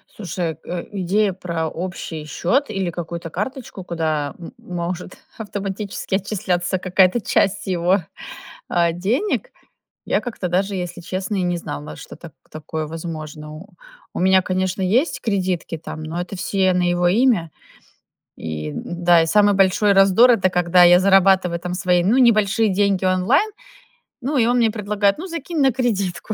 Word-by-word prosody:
Слушай 175 -5 -4
э, 175 -1 -5
идея 200 +1 0
про 170 -3 -3
общий 165 -2 -6
счёт 235 - 0
или 195 -4 -2
какую-то 170 0 -6
карточку, 210 - -5
куда 155 -4 -2
м 170 - -9
может 180 -5 -5 0.2
автоматически 200 -2 -4
отчисляться 190 -2 -1
какая-то 185 +4 +3
часть 195 0 0
его, 180 +1 +2 0.7
а, 170 -1 +2
денег. 240 - -1 0.5
Я - - +1
как-то 225 -6 -4
даже, 195 +3 0
если 175 -2 -5
честно, 185 +3 -3
и 185 - 0
не 175 -1 0
знала, 75 - -7
что - - -11
так - - -12 0.2
такое 155 0 -5
возможно. 155 -2 -7 0.6
У - - -4
меня, 190 +1 +4
конечно, 185 +1 -2
есть 240 - +1
кредитки, 185 -6 -2
там, 155 0 -8
но 160 +2 -5
это 180 +2 -6
все 190 0 +1
на 180 - +1
его 175 0 +2
имя. 215 -6 +2 0.9
И, 75 -1 -5
н-да, 175 - +2
и - - 0
самый 205 +3 +4
большой 195 +2 +3
раздор 195 +5 +6
это 190 -5 +3
когда 180 0 +4
я 175 +1 +7
зарабатываю, 190 -2 +4
там, 180 +1 -5
свои, 180 -1 +2
ну, 215 +8 +3
небольшие 220 -3 +3
деньги 195 -1 +1
онлайн, 195 - +2 0.7
ну, 275 +3 -1
и 230 - +4
он 245 +1 +2
мне 230 -2 +3
предлагает: 205 -2 0
"Ну, 360 - -6
закинь 335 -1 -5
на 270 - +4
кредитку". 215 -5 -2
185 Hz, 155 wpm, -21 LUFS, 175-205 Hz, 0.9 s, я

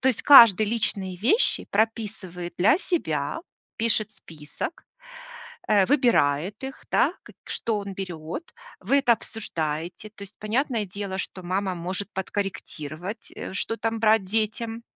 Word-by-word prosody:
То - - -1
есть 245 - 0
каждый 225 -7 +9
личные 200 -4 0
вещи 255 - +3
прописывает 205 -5 -2
для 205 - +5
себя, 160 - -2 0.4
пишет 220 -2 +1
список, 160 - -8 0.8
э, 205 -3 +4
выбирает 200 - +2
их, 270 0 -8
да, - - +3
к - - -15 0.2
что 225 -2 -1
он 200 -1 -6
берёт. 175 - -6 0.4
Вы 280 - +2
это 250 -4 +4
обсуждаете. 175 -3 -5
То 205 - -17
есть, 200 - -12
понятное 230 0 -1
дело, 195 0 -5
что 185 0 -5
мама 190 +1 -1
может 185 +4 -4
подкорректировать, 190 -1 -5
э, - - -7
что 225 +4 -2
там 225 0 -2
брать 220 -2 +4
детям. 225 +3 -2
205 Hz, 135 wpm, -25 LUFS, 180-225 Hz, 0.8 s, каждый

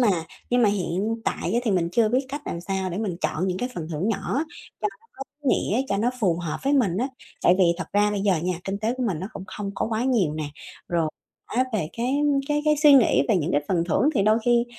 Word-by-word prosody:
mà 240 - +4 0.4
nhưng 245 0 +3
mà 215 - +5
hiện 200 +3 -1
tại - - -1
á 240 - +3
thì 220 - +1
mình 175 -3 +1
chưa 225 0 +3
biết 260 +3 +1
cách 285 +2 -5
làm 170 - -3
sao 190 0 -2
để 180 - -4
mình 195 -6 -2
chọn 180 +4 -1
những 185 0 -1
cái 245 - -2
phần 160 -1 -5
thưởng 165 +7 -1
nhỏ 275 +6 -1 0.4
cho 420 - +1
nó - - -18 0.2
có 270 - -4 0.2
ý 275 - 0
nghĩa, 230 +6 +1
cho 200 - +1
nó 235 +4 +1
phù 175 -5 +2
hợp 170 -3 -3
với 275 +1 +1
mình 210 -11 +2
á. 255 +4 0 0.3
Tại 175 - +6
vì 190 - +6
thật - - -2
ra 205 0 +3
bây 205 -1 -1
giờ 195 -2 +2
nha, 180 0 0
kinh 195 +1 -3
tế 225 +3 -1
của 255 - -2
mình 185 -9 -1
nó 190 - -4
cũng 190 - -7
không 200 +1 -5
có - - -1
quá 225 +1 -1
nhiều 210 - +2
nè, 155 -2 -3 0.4
rồi 165 -2 +1 0.4
á 255 +2 +1
về 175 -8 -1
cái 245 +3 -1 0.3
cái 295 0 +1
cái 305 0 +4
suy 295 -2 +8
nghĩ 230 - +5
về - - +4
những 165 -1 -1
cái 145 - +2
phần 170 -3 +1
thưởng 280 - +3
thì 200 - +3
đôi 215 +2 +4
khi 240 -1 +4
205 Hz, 270 wpm, -24 LUFS, 180-245 Hz, 0.4 s, suy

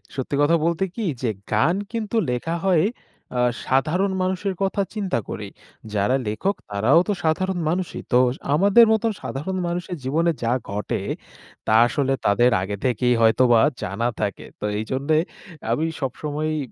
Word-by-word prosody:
সত্যি 135 +1 -2
কথা 150 +3 +4
বলতে 170 +2 +1
কি 230 - -4 0.2
যে 125 - 0 0.2
গান 135 +12 +3 0.2
কিন্তু 225 -1 -3
লেখা 125 +7 -2
হয় 180 -4 +4 0.5
আ - - -1 0.3
সাধারণ 165 +9 +2
মানুষের 190 +1 -1
কথা 195 +1 +1
চিন্তা 200 - -1
করেই। - - -6 0.4
যারা 105 +5 +2
লেখক 190 - -1
তারাও 110 +11 +4
তো 205 - +1
সাধারণ 175 +3 0
মানুষই 180 +1 -2
তো 125 - +5 0.4
আমাদের 200 +8 +6
মতন 220 0 +2
সাধারণ 185 +8 -3
মানুষের 175 0 -3
জীবনে 160 +6 +1
যা 115 - +1 0.2
ঘটে 105 0 -2 0.7
তা 110 - +1
আসলে 135 +2 0
তাদের 120 +5 +4
আগে 100 +2 -3
থেকেই 125 0 +2
হয়তোবা 115 +1 +5 0.2
জানা 110 +6 -1
থাকে। 100 -3 -3
তো - - -4
এইজন্য 130 +7 -4 0.6
আমি 160 - +1 0.2
সবসময়ই 150 +3 -2
155 Hz, 145 wpm, -23 LUFS, 120-185 Hz, 0.7 s, আমাদের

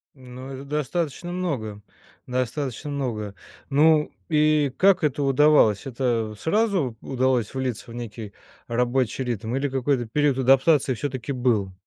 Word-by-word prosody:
Ну, 130 0 -10
это 135 +1 -7
достаточно 150 +4 -3
много, 125 - -3 0.5
достаточно 130 +2 -3
много. 115 -8 -3 0.4
Ну, 150 +2 +4 0.2
и 150 -2 +3
как 190 -2 +4
это 145 -1 0
удавалось? 135 -5 +4
Это 120 -4 -1
сразу 180 - 0
удалось 130 -3 0
влиться 130 -4 -3
в 115 - -9
некий 110 -3 -7 0.4
рабочий 125 +2 0
ритм, 115 -1 -3
или 140 +1 -1
какой-то 130 -1 0
период 145 +3 +1
адаптации 135 +2 +4
всё-таки 130 +1 -4
был? 115 -7 0
130 Hz, 125 wpm, -24 LUFS, 120-150 Hz, 0.5 s, Ну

